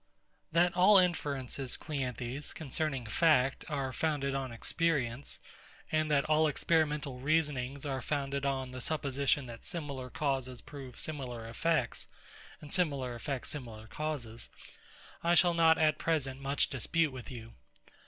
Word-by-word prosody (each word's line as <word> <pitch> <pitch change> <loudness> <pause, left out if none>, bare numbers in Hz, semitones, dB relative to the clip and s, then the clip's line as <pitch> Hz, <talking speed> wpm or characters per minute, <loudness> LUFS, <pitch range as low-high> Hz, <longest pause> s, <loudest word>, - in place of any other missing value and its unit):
That 175 +2 +3
all 190 +3 +7
inferences, 140 -7 0
CLEANTHES, 135 -2 -3
concerning 140 -3 -2
fact, 135 +1 +3
are 135 -3 -2
founded 145 -3 0
on 135 -2 -2
experience; 135 0 -1 0.5
and 155 0 +2
that 145 -1 +3
all 155 0 +4
experimental 150 -3 +1
reasonings 140 -2 0
are 135 -2 -2
founded 140 +1 -2
on 135 -2 -1
the 130 0 -6
supposition 140 -1 +1
that 115 -2 -9
similar 140 -6 -4
causes 130 -3 -1
prove 135 -4 -9
similar 125 -7 -3
effects, 140 +1 0 0.5
and 150 - -5
similar 140 -9 +1
effects 130 +2 -4
similar 115 -6 -7
causes; 120 -4 -5 0.7
I 170 +1 +4
shall 175 0 +5
not 165 -1 +5
at 155 -1 +3
present 140 -5 -1
much 140 +1 +1
dispute 155 +4 +1
with 130 -2 -8
you. 115 -3 -8
140 Hz, 135 wpm, -32 LUFS, 130-155 Hz, 0.7 s, all